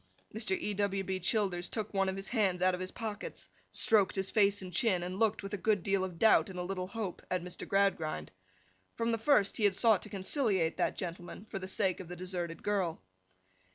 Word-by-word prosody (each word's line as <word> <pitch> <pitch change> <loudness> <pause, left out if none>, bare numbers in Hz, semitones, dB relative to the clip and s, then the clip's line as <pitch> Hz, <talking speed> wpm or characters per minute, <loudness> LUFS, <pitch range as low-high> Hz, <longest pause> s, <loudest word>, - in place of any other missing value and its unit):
Mr. 215 -3 0
E. 210 - -2
W. 195 -1 0
B. 190 0 -2
Childers 185 -2 0
took 220 -2 -3
one 195 -1 +2
of 190 - -3
his 195 0 -4
hands 195 -6 +1
out 185 0 +4
of 180 - -3
his 185 0 -3
pockets, 220 -1 -5 0.2
stroked 205 -4 +3
his 190 -1 -1
face 200 -2 +3
and 180 -1 -8
chin, 185 -2 +2
and 185 +2 -4
looked, 220 -2 +2
with 195 +1 -6
a - - 0
good 205 -3 +1
deal 195 0 +1
of 180 -3 -5
doubt 220 +1 +5
and 185 - -8
a 180 - -2
little 185 0 -3
hope, 210 -3 -5
at 185 -1 -1
Mr. 180 0 -6
Gradgrind. 170 - 0 0.6
From 230 0 0
the 230 - 0
first 220 -5 +3
he 220 - -1
had 200 -2 +4
sought 220 -2 +4
to 215 - -7
conciliate 195 - +1
that - - 0
gentleman, 175 +2 -6
for 195 - -3
the 185 - -6
sake 190 -2 +1
of 185 - -8
the 180 - -7
deserted 175 -2 -5
girl. 195 -5 0
195 Hz, 225 wpm, -32 LUFS, 180-210 Hz, 0.6 s, doubt